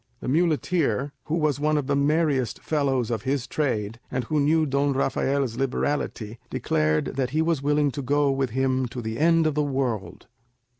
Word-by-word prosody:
The -, -, -7 dB
muleteer, 150 Hz, -, +1 dB
who 155 Hz, -, -1 dB
was 150 Hz, -4 st, +1 dB
one 155 Hz, +1 st, +2 dB
of 145 Hz, -, -1 dB
the 140 Hz, +1 st, 0 dB
merriest 140 Hz, -4 st, +1 dB
fellows 135 Hz, -6 st, 0 dB
of 110 Hz, -3 st, -1 dB
his 130 Hz, +1 st, -1 dB
trade, 115 Hz, -8 st, -2 dB
and 125 Hz, -1 st, -2 dB
who 150 Hz, +6 st, -1 dB
knew 155 Hz, +2 st, +3 dB
Don 140 Hz, 0 st, +1 dB
Rafael's 135 Hz, -2 st, 0 dB
liberality, 125 Hz, -4 st, -2 dB
declared 75 Hz, 0 st, 0 dB
that 130 Hz, -2 st, 0 dB
he 155 Hz, +4 st, +1 dB
was 165 Hz, -4 st, 0 dB
willing 145 Hz, 0 st, +2 dB
to 140 Hz, -, -5 dB
go 145 Hz, +1 st, +2 dB
with 135 Hz, -1 st, 0 dB
him 130 Hz, +1 st, 0 dB
to 120 Hz, +1 st, -6 dB
the 110 Hz, +2 st, -4 dB
end 165 Hz, +1 st, +4 dB
of 155 Hz, -, +2 dB
the 150 Hz, -, +1 dB
world. 130 Hz, -7 st, -2 dB
140 Hz, 185 wpm, -25 LUFS, 125-150 Hz, -, end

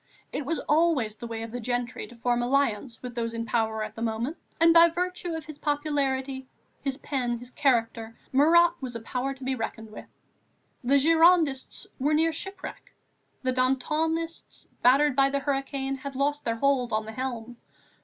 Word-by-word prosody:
It 280 Hz, -, -3 dB
was 330 Hz, +1 st, 0 dB
always 300 Hz, -9 st, +2 dB
the 235 Hz, -, -8 dB
way 225 Hz, -1 st, -5 dB
of 225 Hz, -, -7 dB
these 245 Hz, +1 st, -5 dB
gentry 245 Hz, +1 st, -3 dB
to 240 Hz, -, -14 dB
form 240 Hz, +1 st, 0 dB
alliance 245 Hz, -2 st, 0 dB
with 250 Hz, -1 st, -6 dB
those 230 Hz, -1 st, -3 dB
in 230 Hz, 0 st, -3 dB
power 220 Hz, -1 st, 0 dB
at 215 Hz, 0 st, -6 dB
the 225 Hz, -, -9 dB
moment, 230 Hz, +7 st, -2 dB, 0.2 s
and 330 Hz, 0 st, +6 dB
by 335 Hz, 0 st, +8 dB
virtue 355 Hz, 0 st, -3 dB
of 320 Hz, -1 st, -6 dB
his 305 Hz, -2 st, -10 dB
popularity, 275 Hz, -3 st, -1 dB, 0.3 s
his 270 Hz, -1 st, -2 dB
pen, 250 Hz, -5 st, -2 dB
his 245 Hz, +1 st, -10 dB
character, 230 Hz, -4 st, 0 dB
Marat 335 Hz, +5 st, +6 dB
was 250 Hz, -3 st, -5 dB
a -, -, -3 dB
power 255 Hz, +4 st, -3 dB
to 265 Hz, -, -12 dB
be 265 Hz, +1 st, 0 dB
reckoned 225 Hz, -2 st, -5 dB
with. -, -, -10 dB, 0.8 s
The 270 Hz, +3 st, +4 dB
Girondists 320 Hz, -2 st, +3 dB
were 295 Hz, +3 st, +2 dB
near 325 Hz, +1 st, +2 dB
shipwreck; 385 Hz, +3 st, -8 dB, 0.5 s
the 255 Hz, 0 st, +1 dB
Dantonists, 310 Hz, +6 st, -1 dB
battered 275 Hz, +3 st, +5 dB
by 275 Hz, 0 st, +4 dB
the 280 Hz, -, 0 dB
hurricane, 275 Hz, -1 st, -2 dB
had 275 Hz, 0 st, -7 dB
lost 290 Hz, +2 st, 0 dB
their 230 Hz, -, 0 dB
hold 260 Hz, -1 st, +1 dB
on 215 Hz, 0 st, 0 dB
the 220 Hz, -, -6 dB
helm. 240 Hz, -1 st, -5 dB
265 Hz, 180 wpm, -27 LUFS, 240-295 Hz, 0.8 s, by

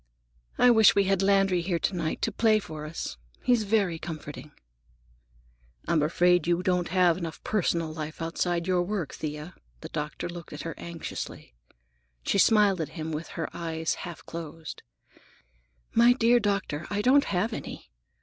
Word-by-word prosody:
I 250 Hz, -, +6 dB
wish 220 Hz, -4 st, +6 dB
we 200 Hz, -, +4 dB
had 195 Hz, -1 st, +1 dB
Landry 195 Hz, -2 st, +3 dB
here 170 Hz, 0 st, 0 dB
to 175 Hz, +4 st, -1 dB
night 165 Hz, -2 st, -2 dB
to -, -, +1 dB
play 220 Hz, -2 st, +3 dB
for 155 Hz, -7 st, -6 dB
us. 155 Hz, -, -5 dB, 0.3 s
He's 240 Hz, -4 st, +3 dB
very 195 Hz, -6 st, +1 dB
comforting." 150 Hz, -2 st, -7 dB, 1.4 s
"I'm 160 Hz, -, +2 dB
afraid 175 Hz, +2 st, +3 dB
you 175 Hz, +1 st, +1 dB
don't 180 Hz, -1 st, +1 dB
have 180 Hz, -1 st, +3 dB
enough 165 Hz, -3 st, -6 dB
personal 170 Hz, -6 st, 0 dB
life, 155 Hz, -1 st, -6 dB
outside 170 Hz, +1 st, -1 dB
your 180 Hz, -1 st, +2 dB
work, 180 Hz, -4 st, -3 dB
Thea." 150 Hz, +2 st, -6 dB, 0.3 s
The -, -, -7 dB
doctor 150 Hz, +2 st, -4 dB
looked 170 Hz, -2 st, -9 dB
at 150 Hz, -, -6 dB
her 165 Hz, -, -4 dB
anxiously. 165 Hz, -, -7 dB, 0.7 s
She 200 Hz, -, +1 dB
smiled 205 Hz, -4 st, +4 dB
at 155 Hz, -, -3 dB
him 160 Hz, 0 st, -4 dB
with 155 Hz, +1 st, -4 dB
her 165 Hz, -, -1 dB
eyes 160 Hz, -1 st, -2 dB
half 175 Hz, -2 st, -8 dB
closed. 165 Hz, -2 st, -7 dB, 1.1 s
"My 235 Hz, +1 st, +6 dB
dear 240 Hz, 0 st, +4 dB
doctor, 200 Hz, -7 st, -1 dB
I 205 Hz, 0 st, -1 dB
don't 280 Hz, +4 st, +5 dB
have 200 Hz, +5 st, 0 dB
any. -, -, -7 dB
175 Hz, 160 wpm, -27 LUFS, 160-200 Hz, 1.4 s, I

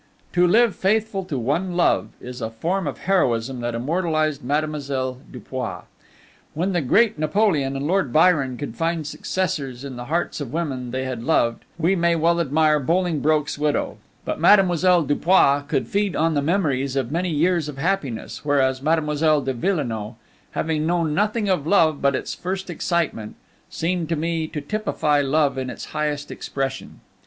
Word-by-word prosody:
To 180 Hz, 0 st, +4 dB
live 230 Hz, +3 st, +4 dB
faithful 210 Hz, 0 st, 0 dB
to 155 Hz, -7 st, -3 dB
one 165 Hz, +9 st, -1 dB
love 175 Hz, -, +2 dB
is 125 Hz, 0 st, -8 dB
a 110 Hz, -, -2 dB
form 170 Hz, +10 st, -2 dB
of 140 Hz, -, -5 dB
heroism 130 Hz, -9 st, +1 dB
that 120 Hz, -1 st, -3 dB
immortalized 155 Hz, +2 st, -1 dB
Mademoiselle 140 Hz, -2 st, -2 dB
Dupuis. 125 Hz, +1 st, -5 dB, 0.7 s
When 180 Hz, +5 st, 0 dB
the 175 Hz, -, +1 dB
great 205 Hz, -, +3 dB
Napoleon 155 Hz, -4 st, +1 dB
and 135 Hz, +1 st, -3 dB
Lord 170 Hz, -5 st, +1 dB
Byron 150 Hz, -5 st, +3 dB
could 130 Hz, -4 st, -6 dB
find 165 Hz, +2 st, -1 dB
successors 140 Hz, -5 st, -3 dB
in 130 Hz, -3 st, -7 dB
the 120 Hz, -, -6 dB
hearts 165 Hz, +2 st, -2 dB
of 130 Hz, -4 st, -5 dB
women 135 Hz, -6 st, -3 dB
they 130 Hz, +2 st, -3 dB
had 130 Hz, -3 st, -4 dB
loved, 115 Hz, -4 st, +1 dB
we 175 Hz, +3 st, +2 dB
may 170 Hz, -1 st, +2 dB
well 170 Hz, +1 st, +2 dB
admire 155 Hz, 0 st, +2 dB
Bolingbroke's 155 Hz, -2 st, 0 dB
widow; 150 Hz, 0 st, 0 dB, 0.3 s
but -, -, -3 dB
Mademoiselle 180 Hz, -3 st, +5 dB
Dupuis 145 Hz, -1 st, +3 dB
could 135 Hz, -5 st, 0 dB
feed 200 Hz, -, -1 dB
on 165 Hz, +1 st, +2 dB
the 145 Hz, -, +1 dB
memories 140 Hz, -5 st, 0 dB
of 130 Hz, -2 st, -1 dB
many 175 Hz, +3 st, -1 dB
years 165 Hz, 0 st, +1 dB
of 140 Hz, -, -8 dB
happiness, 145 Hz, -7 st, -2 dB
whereas 135 Hz, -3 st, +1 dB
Mademoiselle 155 Hz, 0 st, +2 dB
de 135 Hz, 0 st, -2 dB
Villenoix, 120 Hz, -, -2 dB, 0.4 s
having 155 Hz, -1 st, -1 dB
known 170 Hz, -3 st, +1 dB
nothing 210 Hz, +4 st, 0 dB
of 180 Hz, -6 st, 0 dB
love 160 Hz, -6 st, +3 dB
but 140 Hz, -1 st, +2 dB
its -, -, -3 dB
first 190 Hz, +1 st, -4 dB
excitement, 160 Hz, -10 st, -2 dB, 0.3 s
seemed 170 Hz, -1 st, -2 dB
to 165 Hz, -, +1 dB
me 160 Hz, 0 st, -1 dB
to 155 Hz, -1 st, -5 dB
typify 150 Hz, -5 st, 0 dB
love 140 Hz, 0 st, +1 dB
in 130 Hz, -1 st, -3 dB
its -, -, -7 dB
highest 150 Hz, -1 st, -2 dB
expression. 135 Hz, -1 st, -5 dB
155 Hz, 165 wpm, -22 LUFS, 135-175 Hz, 0.7 s, Mademoiselle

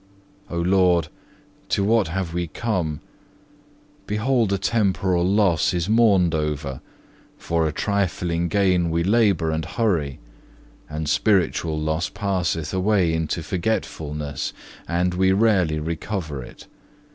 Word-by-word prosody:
2. -, -, -5 dB
O 85 Hz, -, 0 dB
Lord, 90 Hz, -2 st, +3 dB, 0.6 s
to 100 Hz, -, +1 dB
what 110 Hz, -1 st, +3 dB
have 90 Hz, 0 st, -3 dB
we 85 Hz, 0 st, -2 dB
come? 85 Hz, -7 st, -2 dB, 1.1 s
Behold 110 Hz, +1 st, +1 dB
a 100 Hz, -, +2 dB
temporal 95 Hz, -3 st, +1 dB
loss 95 Hz, -3 st, +2 dB
is 85 Hz, 0 st, -1 dB
mourned 100 Hz, -7 st, +4 dB
over; 75 Hz, -4 st, -2 dB, 0.6 s
for 85 Hz, -1 st, 0 dB
a -, -, -1 dB
trifling 85 Hz, -2 st, -1 dB
gain 90 Hz, -2 st, +2 dB
we 85 Hz, +1 st, 0 dB
labour 100 Hz, -5 st, +2 dB
and 80 Hz, 0 st, -1 dB
hurry; 85 Hz, -, -1 dB, 0.7 s
and 75 Hz, 0 st, -4 dB
spiritual 85 Hz, -2 st, +1 dB
loss 80 Hz, +3 st, -1 dB
passeth 90 Hz, -6 st, -2 dB
away 95 Hz, -3 st, +2 dB
into 80 Hz, +1 st, -2 dB
forgetfulness, 75 Hz, -6 st, -3 dB, 0.3 s
and 90 Hz, +1 st, 0 dB
we 95 Hz, +1 st, +3 dB
rarely 95 Hz, -6 st, +2 dB
recover 80 Hz, -1 st, -4 dB
it. -, -, -12 dB
90 Hz, 120 wpm, -23 LUFS, 80-100 Hz, 1.1 s, mourned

